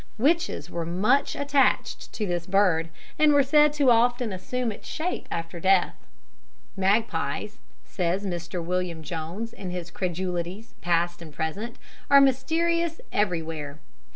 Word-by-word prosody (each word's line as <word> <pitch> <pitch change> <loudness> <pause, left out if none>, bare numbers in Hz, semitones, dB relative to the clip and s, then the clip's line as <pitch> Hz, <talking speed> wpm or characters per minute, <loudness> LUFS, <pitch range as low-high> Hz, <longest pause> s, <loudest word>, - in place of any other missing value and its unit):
Witches 280 - +1
were 170 -1 -4
much 200 +12 +1
attached 285 -1 +1
to 215 - -2
this 175 -2 -2
bird, 185 -4 +3 0.3
and 305 -1 +6
were 285 -1 +5
said 295 +2 +5
to 285 -4 +4
often 240 -1 +2
assume 230 +6 -2
its 205 - -10
shape 340 +3 -3
after 165 +1 -4
death. 190 +1 +3 0.8
"Magpies," 200 +4 0 0.3
says 185 +2 -1
Mr. 175 -1 -4
William 175 -2 -2
Jones, 175 +8 -5
in 185 - -7
his 175 -1 -5
Credulities, 180 +3 -3
Past 175 0 0
and 160 -2 -9
Present, 195 +10 -4 0.3
"are 280 - +8
mysterious 325 +5 +2
everywhere. 165 -7 -2
190 Hz, 130 wpm, -26 LUFS, 170-255 Hz, 0.8 s, are